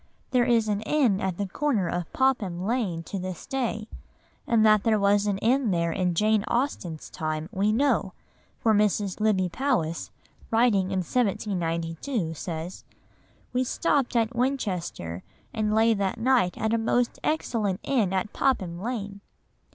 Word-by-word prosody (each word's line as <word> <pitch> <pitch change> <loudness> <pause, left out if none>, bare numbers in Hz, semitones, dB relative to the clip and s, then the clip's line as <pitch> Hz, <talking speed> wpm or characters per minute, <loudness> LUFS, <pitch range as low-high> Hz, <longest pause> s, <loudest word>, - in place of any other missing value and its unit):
There 250 -2 +3
is 230 -3 +3
an 205 -1 0
inn 225 -5 +2
at 190 -2 -2
the 200 - -2
corner 225 -3 0
of 175 -1 -3
Popham 210 -10 0
Lane 205 -8 -1
to 195 +4 -5
this 185 -2 -6
day, 230 -5 -2 0.6
and 225 -2 +4
that 215 -1 +6
there 225 -2 +3
was 200 +1 +3
an 200 -2 +1
inn 245 +3 +2
there 170 -2 +1
in 180 0 0
Jane 215 +2 +3
Austen's 235 - -2
time 155 -2 -3
we 205 0 +1
know, 230 -6 +1 0.4
for 225 - +2
Mrs. 205 -2 +1
Lybbe 200 -4 +2
Powys, 170 - -1 0.4
writing 225 -5 +3
in 190 -1 0
1792, 175 - -1
says: 165 +2 -6 0.7
"We 250 +1 +2
stopped 270 -1 0
at 230 +1 +1
Winchester 185 - -2 0.3
and 215 -1 0
lay 225 +1 +5
that 200 -2 -1
night 235 -7 +2
at 220 +1 0
a 230 - +2
most 240 +2 0
excellent 220 -11 0
inn 230 -9 +1
at 190 +2 -1
Popham 185 -11 0
Lane." 205 -3 -4
210 Hz, 150 wpm, -26 LUFS, 185-240 Hz, 0.7 s, that